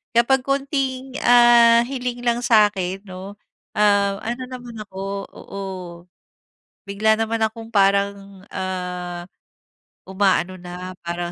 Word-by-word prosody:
Kapag 250 +2 +3
konting, 270 -2 -2
ah, 240 -1 +7
hiling 250 -2 -4
lang 235 0 +2
sa'kin 205 -5 +2
'no, 190 +2 -9 0.4
ah, 200 -1 +3
ano 240 +3 -3
naman 245 -2 -8
ako 190 0 -8 0.3
oo. 195 0 -8 1.2
Bigla 215 +2 +2
naman 225 0 -1
akong 225 +1 -6
parang, 200 -1 +1
ah, 180 -2 -4 0.8
uma-ano 190 -1 +1
na 180 +1 -7
parang 175 0 -3
205 Hz, 105 wpm, -22 LUFS, 190-240 Hz, 1.2 s, ah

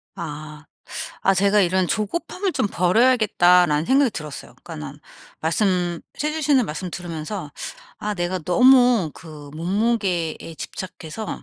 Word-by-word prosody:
아. 155 -1 -7 0.6
아 195 - +4
제가 200 +2 +3
'이런 185 0 +2
조급함을 340 - -2
좀 - - 0
버려야겠다.'라는 180 -6 +4
생각이 270 -1 +4
들었어요. 150 -7 -8
그러니까는 75 -1 -8 0.4
말씀 175 0 0 0.2
해 300 +1 0
주시는 290 -6 +2
말씀 175 +4 -5
들으면서 170 0 -6 0.5
아 210 0 -3
내가 175 0 -2
너무 245 0 +5
그 150 -3 -11
몸무게에 185 -1 0 0.2
집착해서 185 +4 -7
185 Hz, 295 characters per minute, -22 LUFS, 165-220 Hz, 0.6 s, 너무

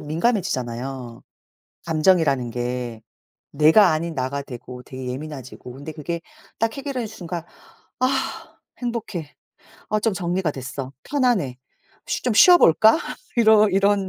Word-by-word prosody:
민감해지잖아요, 135 - -2 0.6
감정이라는 155 -6 +2
게. 120 -1 -4 0.5
내가 160 +6 +6
아닌 160 +1 -2
나가 130 +2 -2
되고 125 -1 -9
되게 130 0 -8
예민해지고 130 -2 -7
근데 140 +4 -8
그게 165 +2 -4 0.4
딱 225 0 0
해결한 275 -4 -3
순간 175 -6 -6 0.6
'아 255 - +3 0.7
행복해. 220 - -4 0.6
아 215 0 +1
좀 220 -1 +1
정리가 175 -2 -1
됐어. 135 0 -6
편안해. 240 - +1 0.5
쉬 - - -2
좀 250 - +1
쉬어볼까?' 220 - +7 0.4
이러 220 -2 +6
이런 195 0 +2
160 Hz, 265 characters per minute, -23 LUFS, 130-215 Hz, 0.7 s, 쉬어볼까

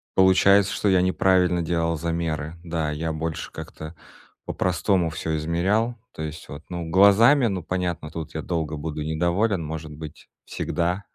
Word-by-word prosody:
получается, 95 +1 +5
что 105 - 0
я 95 -1 +4
неправильно 90 -1 +2
делал 85 0 0
замеры. 80 -1 -3
Да, 80 -3 -2
я 80 +2 -3
больше 80 +1 -4
как-то 80 +2 -9 0.5
по-простому 90 -1 0
всё 80 0 -3
измерял, 95 +9 0 0.2
то - - -8
есть 80 0 -7
вот, 75 +2 -8
ну, 85 -2 -5
глазами, 110 - +6
ну 95 -5 -3
понятно, 85 -3 -3
тут 80 -1 -7
я - - -2
долго 80 -3 -2
буду 75 +1 -5
недоволен, 85 +5 0
может 80 0 -6
быть, 75 0 -10 0.2
всегда. 90 +4 -2
85 Hz, 150 wpm, -24 LUFS, 80-95 Hz, 0.5 s, глазами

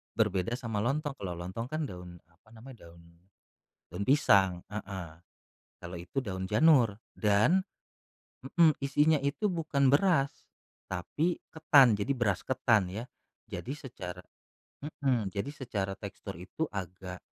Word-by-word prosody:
Berbeda 100 +7 0
sama 110 -4 -2
lontong, 145 +3 -1
kalau 95 -8 -5
lontong 95 +7 -5
kan 155 -1 -1
daun, 90 -4 -10
apa 85 +6 -27
namanya, 115 +2 -13
daun 85 0 -17 0.8
daun 90 +4 -5
pisang, 100 -8 +3
heeh. 95 -5 -6 0.7
Kalau 85 +1 -7
itu 85 +10 -3
daun 95 -6 -4
janur. 115 - +4 0.2
Dan 110 - +3 0.8
mhm, 160 +1 +4
isinya 145 +3 +3
itu 140 +9 -1
bukan 155 -6 +1
beras, 140 -1 +2 0.4
tapi 150 - -2
ketan. 140 -8 +5
Jadi, 105 +7 0
beras 110 -8 0
ketan, 115 -5 +3
ya. 110 +4 -4 0.4
Jadi, 130 - -5
secara 120 - -8 0.8
mhm, 120 -8 +1
jadi 105 +7 -2
secara 100 -9 -4
tekstur - - -8
itu 95 - -4
agak 90 -1 -6
115 Hz, 130 wpm, -30 LUFS, 95-140 Hz, 0.8 s, ketan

